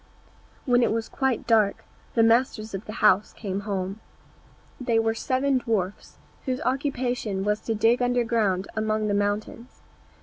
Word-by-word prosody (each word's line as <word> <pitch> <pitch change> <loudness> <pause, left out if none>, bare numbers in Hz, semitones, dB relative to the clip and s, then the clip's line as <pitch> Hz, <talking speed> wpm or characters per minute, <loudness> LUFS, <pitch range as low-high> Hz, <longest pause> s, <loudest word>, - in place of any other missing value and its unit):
When 245 -1 +4
it 235 - +2
was 225 0 -1
quite 265 -4 -1
dark, 215 -3 +2 0.3
the 230 - +5
masters 225 -2 +2
of 195 +3 -5
the 215 - -7
house 205 0 +4
came 195 -3 -4
home. 195 +1 -3 0.8
They 240 -3 +1
were 225 0 +2
seven 260 +3 0
dwarfs, 205 -5 -3 0.3
whose 255 -1 -1
occupation 250 -7 -1
was 210 +1 0
to 225 - -3
dig 230 +3 +3
underground 230 -6 +1
among 215 0 0
the - - +1
mountains. 205 +4 -3
225 Hz, 145 wpm, -25 LUFS, 205-245 Hz, 0.8 s, the